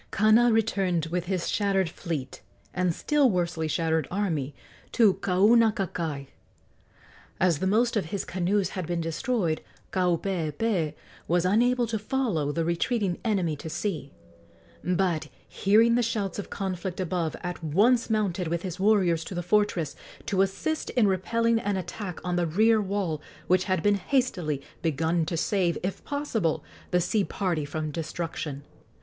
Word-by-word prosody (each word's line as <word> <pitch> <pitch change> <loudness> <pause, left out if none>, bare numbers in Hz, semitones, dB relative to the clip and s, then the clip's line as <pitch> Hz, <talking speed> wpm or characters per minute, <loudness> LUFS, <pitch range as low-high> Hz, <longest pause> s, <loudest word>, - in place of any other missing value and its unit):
Kana 220 +4 +5
returned 195 -7 +1
with 175 0 -1
his 185 -1 -2
shattered 195 -3 +1
fleet 155 -5 -5 0.3
and 180 -1 +1
still 290 - +2
worsely 170 -4 -1
shattered 160 -1 0
army 160 -8 -2 0.4
to 220 -5 +5
Kaunakakai. 190 -7 +2 1.1
As 175 -5 +3
the 190 - 0
most 230 +5 +2
of 210 - +1
his 195 +5 -4
canoes 190 +2 0
had 185 -4 -5
been 175 -1 -1
destroyed, 165 +1 -1 0.3
Kaupeepee 175 -1 0 0.3
was 175 +1 +2
unable 240 +5 +3
to 225 -1 -2
follow 210 - -1
the 165 +2 -1
retreating 180 +2 0
enemy 190 -9 0
to 160 - -7
sea, 155 -4 -3 0.7
but, 180 -3 0 0.2
hearing 220 +4 +4
the 245 - +3
shouts 210 -4 -2
of 205 - -6
conflict 190 -1 -4
above, 175 -3 -1
at 180 -1 -5
once 220 - +3
mounted 200 -5 0
with 170 +1 -2
his 180 -1 -5
warriors 190 -5 +3
to 185 - -6
the 175 - -2
fortress, 180 -4 +1 0.3
to 190 -1 +1
assist 250 +11 -1
in 235 -5 +3
repelling 230 +5 +1
an 205 -2 -1
attack 185 +1 -5
on 180 -1 0
the 175 -1 +1
rear 220 +6 +4
wall 190 -6 -2 0.2
which 185 +1 +2
had 185 -4 0
been 205 - +4
hastily 195 - 0 0.2
begun 160 +1 0
to 170 - -2
save, 175 0 +1
if 185 +1 -3
possible, 235 - -1 0.3
the 180 - +2
sea 190 +4 +1
party 175 -7 -1
from 155 +1 -4
destruction. 155 -2 -4
185 Hz, 150 wpm, -27 LUFS, 165-210 Hz, 1.1 s, Kana